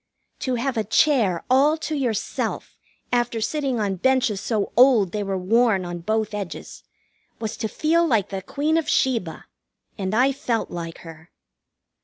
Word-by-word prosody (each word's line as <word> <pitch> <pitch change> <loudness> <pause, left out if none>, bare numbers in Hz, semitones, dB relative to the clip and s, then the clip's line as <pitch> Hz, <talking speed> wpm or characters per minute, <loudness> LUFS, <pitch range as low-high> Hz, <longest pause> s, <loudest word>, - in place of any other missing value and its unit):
To 255 -2 -1
have 250 +1 -2
a 220 - +1
chair 215 - +2
all 280 +5 +4
to 315 0 -4
yourself, 245 -7 -2 0.4
after 240 -1 +1
sitting 270 0 -1
on 200 -3 -1
benches 245 -2 +1
so 215 -2 -1
old 235 -7 +5
they 210 - -2
were 195 -1 -2
worn 205 0 +2
on 175 0 -5
both 215 +4 -1
edges, 200 -4 -6 0.6
was 220 -1 -4
to 220 - -2
feel 330 +8 +1
like 225 - +1
the 195 -1 -4
Queen 290 - 0
of 325 - -1
Sheba, 230 -11 0 0.5
and 190 +1 -2
I 260 +4 +4
felt 255 -5 -2
like 165 -1 -6
her. 165 0 -12
225 Hz, 160 wpm, -23 LUFS, 195-265 Hz, 0.6 s, old